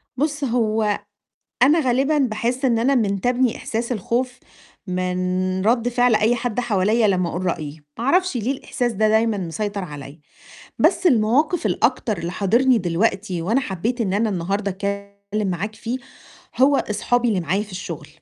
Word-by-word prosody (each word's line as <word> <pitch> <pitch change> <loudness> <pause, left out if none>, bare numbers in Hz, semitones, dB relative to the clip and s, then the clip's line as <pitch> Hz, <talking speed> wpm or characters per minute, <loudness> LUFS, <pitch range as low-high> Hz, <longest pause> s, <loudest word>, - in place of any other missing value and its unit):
بُص 290 +1 -1
هو 220 -4 +1 0.6
أنا 300 +5 +6
غالبًا 270 +3 +2
باحِسّ 250 0 -1
إن 235 -3 +3
أنا 260 +5 +2
منتابني 245 +2 +1
إحساس 235 +2 -3
الخوف، 245 +4 -2 0.5
من 185 0 -1
رد 235 +1 +3
فعل 245 -1 +3
أي 215 +3 +3
حد 245 0 -2
حواليّا 215 -1 +2
لمّا 180 -3 +1
أقول 180 +2 -3
رأيي، 155 -3 -4 0.2
ما 235 - -3
أعرفش 360 +1 +2
ليه 240 +4 0
الإحساس 245 -2 -2
ده 215 +1 +2
دايمًا 220 0 +2
مسيطر 200 +3 -3
عليّا، 145 -2 -9 0.6
بس - - +3
المواقف 270 +4 +3
الأكتر 225 +2 0
اللي 170 +1 -4
حاضرني 235 +7 +3
دلوقتي، 185 0 -1
وأنا 225 +10 +1
حبيت 235 +1 -3
إن 200 -5 0
أنا 220 +2 +1
النهارده 195 +2 -1
أتكلِّم 200 +1 -4
معاك 200 +5 -3
فيه 235 +3 -4 0.6
هو 275 +2 +5
أصحابي 240 +4 +1
اللي 205 -5 +1
معايا 180 +5 0
في 210 -2 -11
الشُّغل، 185 - -6
215 Hz, 155 wpm, -22 LUFS, 190-245 Hz, 0.6 s, أنا